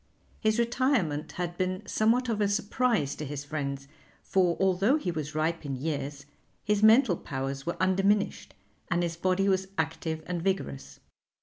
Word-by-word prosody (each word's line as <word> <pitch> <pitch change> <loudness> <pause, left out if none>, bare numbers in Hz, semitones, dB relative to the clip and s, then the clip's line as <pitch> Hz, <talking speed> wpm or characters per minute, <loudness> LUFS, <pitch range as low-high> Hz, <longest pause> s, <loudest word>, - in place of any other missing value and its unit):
His 215 0 +2
retirement 235 - +1
had 175 -1 -4
been 185 0 -1
somewhat 235 +4 +2
of 220 -3 -1
a 205 - +3
surprise 205 - +1
to - - -5
his 145 -1 -5
friends, 140 -2 -4 0.4
for 180 -3 +2
although 195 +8 +3
he 185 - -2
was 155 -2 -5
ripe 165 +2 0
in 140 -2 -3
years, 140 0 -4 0.4
his 210 -1 +1
mental 220 -2 +6
powers 135 -1 -5
were 170 - -2
undiminished 195 +2 +1 0.3
and 175 -1 +1
his 170 -1 -2
body 185 +3 +1
was 190 -1 +1
active 160 0 -2
and 175 -1 -3
vigorous. 70 - -3
180 Hz, 155 wpm, -28 LUFS, 150-205 Hz, 0.4 s, mental